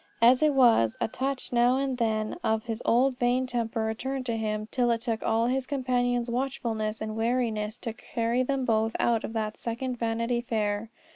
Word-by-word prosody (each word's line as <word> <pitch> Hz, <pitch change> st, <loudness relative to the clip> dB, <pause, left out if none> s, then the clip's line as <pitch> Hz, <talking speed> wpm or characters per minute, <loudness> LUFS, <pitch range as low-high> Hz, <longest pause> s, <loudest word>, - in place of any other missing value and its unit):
As 245 Hz, +3 st, +6 dB
it 305 Hz, -2 st, +3 dB
was, 230 Hz, -, +4 dB
a -, -, +1 dB
touch 260 Hz, +3 st, -3 dB
now 245 Hz, +2 st, +4 dB
and 270 Hz, -2 st, -1 dB
then 215 Hz, -2 st, 0 dB
of 220 Hz, 0 st, +1 dB
his 230 Hz, -1 st, -4 dB
old 250 Hz, +2 st, +3 dB
vain 245 Hz, +1 st, +2 dB
temper 235 Hz, -2 st, -2 dB
returned 255 Hz, +4 st, -3 dB
to 235 Hz, -2 st, -1 dB
him 215 Hz, -1 st, -2 dB
till 245 Hz, -2 st, +1 dB
it 230 Hz, -1 st, +1 dB
took 230 Hz, -2 st, -2 dB
all 225 Hz, +1 st, +1 dB
his 255 Hz, +1 st, 0 dB
companion's 245 Hz, -3 st, 0 dB
watchfulness 235 Hz, -4 st, -2 dB
and 215 Hz, 0 st, -4 dB
wariness 225 Hz, -2 st, -1 dB
to 230 Hz, -, -5 dB
carry 235 Hz, 0 st, -1 dB
them 265 Hz, 0 st, -1 dB
both 225 Hz, -1 st, +1 dB
out 230 Hz, -2 st, +2 dB
of -, -, -5 dB
that 215 Hz, -1 st, -2 dB
second 245 Hz, +1 st, -4 dB
Vanity 230 Hz, +1 st, 0 dB
Fair. 215 Hz, -2 st, -1 dB
235 Hz, 190 wpm, -27 LUFS, 220-250 Hz, -, As